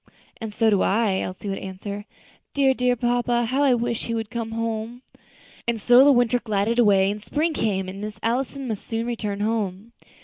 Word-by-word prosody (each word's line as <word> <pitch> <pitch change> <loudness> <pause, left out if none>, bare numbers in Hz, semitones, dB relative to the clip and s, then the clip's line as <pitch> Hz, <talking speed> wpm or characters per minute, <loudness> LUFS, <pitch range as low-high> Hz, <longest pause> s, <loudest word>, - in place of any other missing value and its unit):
"And 225 -3 -6
so 220 +1 +2
do 200 - +3
I," 200 -2 +2
Elsie 185 +3 -5
would 195 -1 -2
answer; 200 +2 -6 0.5
"dear, 270 -2 +4
dear 250 -1 +1
papa, 240 0 +1
how 260 +5 0
I 270 -3 +4
wish 235 -1 -2
he 230 - -2
would 225 -1 -4
come 230 -2 -3
home!" 230 +2 -3 0.6
And 235 -1 0
so 245 +4 +6
the 285 - +7
winter 245 -2 +3
glided 220 +1 0
away, 200 -4 +4
and 210 +1 -6
spring 315 +6 0
came, 195 -7 -1
and 195 +2 -7
Miss 215 +1 -6
Allison 260 +3 -1
must 220 -4 -4
soon 225 0 -2
return 210 -4 -3
home. 210 -1 -2
225 Hz, 195 wpm, -24 LUFS, 205-245 Hz, 0.6 s, the